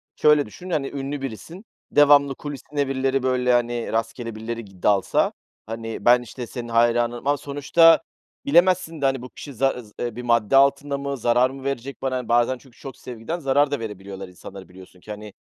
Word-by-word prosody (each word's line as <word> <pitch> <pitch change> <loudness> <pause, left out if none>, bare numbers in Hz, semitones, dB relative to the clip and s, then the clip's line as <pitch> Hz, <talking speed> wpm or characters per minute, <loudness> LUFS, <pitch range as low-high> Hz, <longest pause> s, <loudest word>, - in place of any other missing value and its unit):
şöyle 150 -1 +4
düşün, 180 - -11
hani, 150 -5 -1
ünlü 140 0 -5
birisin, 135 - -8 0.3
devamlı 145 -2 +5
kulisine 145 0 -4
birileri, 135 0 0
böyle, 125 -1 +2
hani, 120 -1 0
rastgele 115 0 -3
birileri 115 +1 -5
gi 95 -3 -18
dalsa, 100 -2 +2 0.3
hani, 115 0 -6
ben, 125 +1 +6
işte, 120 +1 -8
senin 120 +1 -7
hayranınım 120 +2 +1
ama 145 0 +3
sonuçta 145 +4 +4 0.4
bilemezsin 170 0 +3
de, - - +1
hani, 135 -2 +1
bu 125 - -9
kişi 140 - -10
zaz 125 -3 -1
eee, 120 -2 -3
bir 125 - -6
madde 120 -1 +2
altında 140 +1 +3
mı, 140 0 -4
zarar 120 +2 +3
mı 135 0 -10
verecek 140 0 -4
bana? 130 -3 -2
Bazen 120 +2 +2
çünkü 125 -1 -21
çok 135 - -9
sevgiden 125 +8 -6
zarar 145 -1 +2
da 145 - -1
verebiliyorlar 100 -3 -7
insanlara, 95 +1 -12
biliyorsun 90 0 -15
ki, 105 - -11
hani, 105 -1 -8
125 Hz, 180 wpm, -23 LUFS, 115-140 Hz, 0.4 s, ben